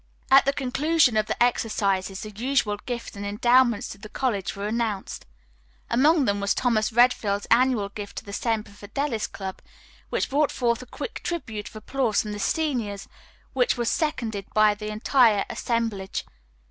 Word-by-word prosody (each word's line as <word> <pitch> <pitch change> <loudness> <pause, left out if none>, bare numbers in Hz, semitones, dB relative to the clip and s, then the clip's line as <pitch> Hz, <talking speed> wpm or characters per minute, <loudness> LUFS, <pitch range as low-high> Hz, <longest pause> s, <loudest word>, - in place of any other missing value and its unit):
At 270 +1 +7
the 275 - +3
conclusion 275 0 +2
of 215 0 +2
the - - +1
exercises 200 -5 0
the 215 - -7
usual 225 -1 0
gifts 240 -4 -5
and 200 - -6
endowments 235 +2 +3
to 195 - -9
the 215 +1 -10
college 215 -8 -2
were 200 +1 -4
announced. 220 -3 -3 0.6
Among 285 +5 +4
them 200 -2 +1
was 200 0 +1
Thomas 220 -3 +1
Redfield's 220 -4 +3
annual 235 -4 +3
gift 205 0 -8
to - - -6
the 200 - -8
Semper 225 -1 -1
Fidelis 220 +4 -3
Club, 190 -2 -7 0.5
which - - -1
brought 290 +1 +3
forth 235 -2 0
a 255 - -11
quick 445 - -6
tribute 225 -12 -4
of - - -20
applause 225 0 0
from 210 - -5
the 205 - -5
seniors, 230 -7 -1 0.5
which - - +2
was 235 -1 0
seconded 230 - -2
by 215 -1 +5
the 210 +1 -7
entire 215 0 +3
assemblage. 225 -5 -2
225 Hz, 165 wpm, -25 LUFS, 205-255 Hz, 0.6 s, At